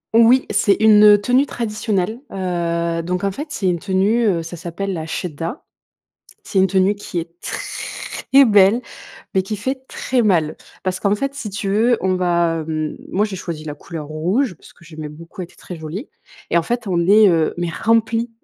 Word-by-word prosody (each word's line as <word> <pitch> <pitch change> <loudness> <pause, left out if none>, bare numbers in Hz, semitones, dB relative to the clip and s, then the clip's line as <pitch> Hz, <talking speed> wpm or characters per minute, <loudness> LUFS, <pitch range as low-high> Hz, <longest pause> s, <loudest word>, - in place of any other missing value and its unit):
Oui, 235 +3 +6
c'est 200 -1 +3
une, 215 -1 +6
heu, 205 -1 +8
tenue 250 +6 +3
traditionnelle, 215 -3 -2
heu, 170 -2 -1
donc 180 +2 -3
en 200 - +1
fait 290 +11 -6
c'est 255 -10 -4
une 175 -2 +1
tenue, 200 +5 +1
heu, 170 -5 +1
ça 165 +2 -7
s'appelle 175 +4 -4
la 160 -2 -4
chedda. 165 - -4 0.8
C'est 195 - 0
une 190 - +5
tenue 190 +1 +3
qui 200 -3 -7
est 165 0 -7
très 275 +1 0
belle, 205 +1 +5 0.5
mais 190 - +3
qui 195 +3 -4
fait 260 +5 -3
très 255 -2 -1
mal. 165 -8 +2 0.3
Parce 185 0 -2
qu'en 200 0 +2
fait 275 +6 -3
si 280 -6 -6
tu 200 0 -4
veux, 225 +4 +3
on 190 0 +1
va, 170 -2 +1
hem, 155 -1 -2
moi, 205 +3 +1
j'ai 205 -3 -5
choisi 170 -4 -6
la 150 -1 -5
couleur 150 +1 -8
rouge, 180 - 0
parce - - -18
que, 170 - -20
j'aimais 155 -1 -8
beaucoup, 165 +5 -10
elle - - -4
était 170 - -22
très 180 - -9
jolie 160 - -6 0.4
et - - +4
en - - -3
fait, 235 +5 -2
on 185 -3 0
les, 200 +5 +6
heu, 165 -2 +1
mais 175 -1 -1
remplies 230 +3 +1
190 Hz, 200 wpm, -20 LUFS, 170-220 Hz, 0.8 s, heu